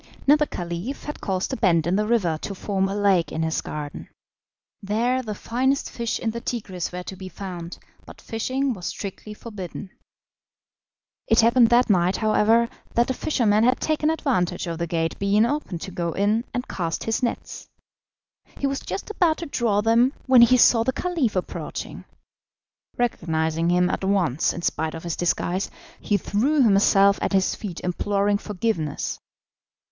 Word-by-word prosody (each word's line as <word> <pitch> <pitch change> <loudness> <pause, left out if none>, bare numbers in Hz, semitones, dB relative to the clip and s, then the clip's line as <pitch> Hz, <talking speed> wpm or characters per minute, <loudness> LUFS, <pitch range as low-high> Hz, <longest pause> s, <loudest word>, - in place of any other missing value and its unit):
Now 285 - +7
the 300 0 +1
Caliph 175 +10 -5
had 295 - -7
caused 190 +5 -2
a - - 0
bend 170 -7 +3
in 175 +2 +1
the 210 +1 +1
river 185 -9 +1
to 200 - -5
form 195 0 -1
a 195 - -3
lake 195 -6 +2
in 160 - -2
his 160 0 -1
garden. 150 -1 -7 0.7
There 235 +6 0
the 215 -4 -5
finest 260 +6 -1
fish 235 -1 -2
in 225 - -2
the 235 +1 -6
Tigris 195 -8 -4
were 180 0 -5
to 190 - -7
be 185 0 -8
found, 180 -3 -7 0.3
but - - -12
fishing 255 +4 -2
was 180 -5 -6
strictly 210 +1 -6
forbidden. 200 -3 -8 1.4
It 225 - +5
happened 235 +1 +5
that 245 +1 +4
night, 185 -2 +2
however, 220 +2 +3 0.3
that 240 +2 +3
a - - 0
fisherman 225 -6 +1
had 250 +2 +3
taken 310 0 +1
advantage 210 - 0
of 165 -1 -4
the 170 - -1
gate 165 0 -2
being 200 +2 +3
open 270 - -2
to 190 - -7
go 170 -2 -2
in 210 +4 +1
and 250 0 -3
cast 165 -3 -3
his 225 +2 -1
nets. 240 -2 -4 0.9
He - - -2
was 275 0 0
just 190 - -5
about 345 -6 +2
to 340 - -5
draw 230 -8 +1
them 230 +5 +3
when 260 -2 +6
he 250 +2 +6
saw 235 -1 +5
the 260 +2 0
Caliph 330 - -1
approaching. 185 - -5 0.9
Recognising 165 -7 0
him 180 0 +3
at 180 - -2
once 185 -8 +1
in 170 - -7
spite 160 0 -1
of 165 - -8
his 170 -2 -3
disguise, 175 +2 -1 0.3
he 205 - +1
threw 260 - +1
himself 200 -2 +4
at - - -1
his 190 -1 +2
feet 185 -6 -6
imploring 200 +3 0
forgiveness. 200 -8 -2
205 Hz, 175 wpm, -24 LUFS, 180-240 Hz, 1.4 s, Now